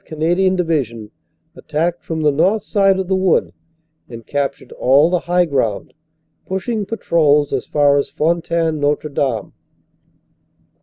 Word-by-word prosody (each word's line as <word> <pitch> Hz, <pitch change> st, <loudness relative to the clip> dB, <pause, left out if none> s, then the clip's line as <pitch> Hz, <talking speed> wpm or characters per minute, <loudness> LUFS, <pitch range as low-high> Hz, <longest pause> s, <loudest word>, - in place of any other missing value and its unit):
Canadian 175 Hz, +4 st, 0 dB
Division 130 Hz, -11 st, -2 dB, 0.4 s
attacked 165 Hz, +3 st, -2 dB
from 160 Hz, -1 st, -4 dB
the 150 Hz, -1 st, +3 dB
north 190 Hz, +9 st, +1 dB
side 195 Hz, -2 st, +2 dB
of 190 Hz, -1 st, -3 dB
the 190 Hz, -, +1 dB
Wood 185 Hz, -2 st, +1 dB, 0.6 s
and 115 Hz, -1 st, -10 dB
captured 140 Hz, -1 st, -3 dB
all 140 Hz, +6 st, +3 dB
the 180 Hz, -, +2 dB
high 175 Hz, +1 st, +1 dB
ground, 130 Hz, -10 st, -2 dB, 0.5 s
pushing 205 Hz, +2 st, -3 dB
patrols 150 Hz, -10 st, +1 dB
as 130 Hz, -, -2 dB
far 145 Hz, -1 st, +3 dB
as -, -, -3 dB
Fontaine 165 Hz, 0 st, -1 dB
Notre 145 Hz, +1 st, 0 dB
Dame. 130 Hz, -7 st, -2 dB
160 Hz, 135 wpm, -18 LUFS, 140-180 Hz, 0.6 s, the